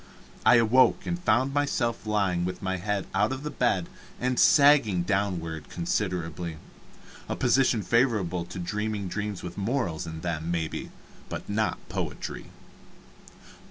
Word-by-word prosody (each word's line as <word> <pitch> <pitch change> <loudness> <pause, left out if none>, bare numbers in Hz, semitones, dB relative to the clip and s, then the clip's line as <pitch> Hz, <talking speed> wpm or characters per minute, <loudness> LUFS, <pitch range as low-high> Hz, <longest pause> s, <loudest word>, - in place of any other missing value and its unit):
I - - +8
awoke, 115 +3 +4
and 175 0 -2
found 130 +2 +2
myself 125 -6 0
lying 100 -5 +1
with 90 +2 -4
my 95 -1 -1
head 100 +1 -2
out 105 +3 +2
of 135 +1 -4
the 150 - -4
bed 95 -8 +1 0.3
and 125 0 0
"sagging" 140 - +5
downward 85 -6 -2
considerably 85 -2 -2 0.7
a - - -1
position 120 -5 +2
favorable 95 -5 +1
to 90 +1 -9
dreaming 105 +3 -2
dreams 105 +1 -4
with 90 +2 -6
morals 100 - -1
in 80 -1 -6
them, 85 -1 -3
maybe, 85 -2 -2 0.4
but - - -6
not 110 +2 0
poetry. - - -5
100 Hz, 135 wpm, -27 LUFS, 90-115 Hz, 0.7 s, I